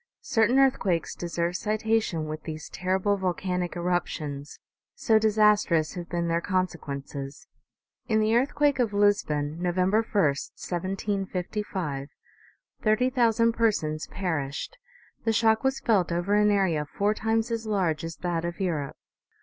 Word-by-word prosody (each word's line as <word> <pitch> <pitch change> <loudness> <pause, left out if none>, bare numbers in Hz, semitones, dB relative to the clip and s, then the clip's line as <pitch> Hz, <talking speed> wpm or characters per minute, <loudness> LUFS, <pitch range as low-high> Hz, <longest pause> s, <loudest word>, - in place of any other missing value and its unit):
Certain 225 +3 +2
earthquakes 200 -11 +2
deserve 170 0 -2
citation 215 -5 0
with 155 0 -5
these 155 -1 -7
terrible 190 +2 0
volcanic 180 -1 -2
eruptions, 165 -5 -3 0.4
so 220 -2 +3
disastrous 210 -7 +3
have 175 -1 -7
been 170 -1 -1
their 170 0 +1
consequences. 145 -7 -3 0.6
In 220 -3 +2
the 215 +1 +2
earthquake 285 +2 +2
of 230 -4 +1
Lisbon, 165 -7 +1
November 185 +4 +2
i, 225 -2 -1
1755, 185 0 -2 0.7
thirty 230 +4 +2
thousand 230 -2 +3
persons 160 -10 0
perished; 160 - -3 0.5
the 225 - +2
shock 220 0 +3
was 265 0 +1
felt 190 -7 +2
over 175 +4 0
an 210 0 +4
area 190 -7 +2
four 205 +6 0
times 225 +1 0
as 225 -1 -3
large 180 -7 0
as 165 0 -5
that 170 -2 -1
of 170 0 -4
Europe. 160 -7 -2
185 Hz, 130 wpm, -27 LUFS, 165-220 Hz, 0.7 s, an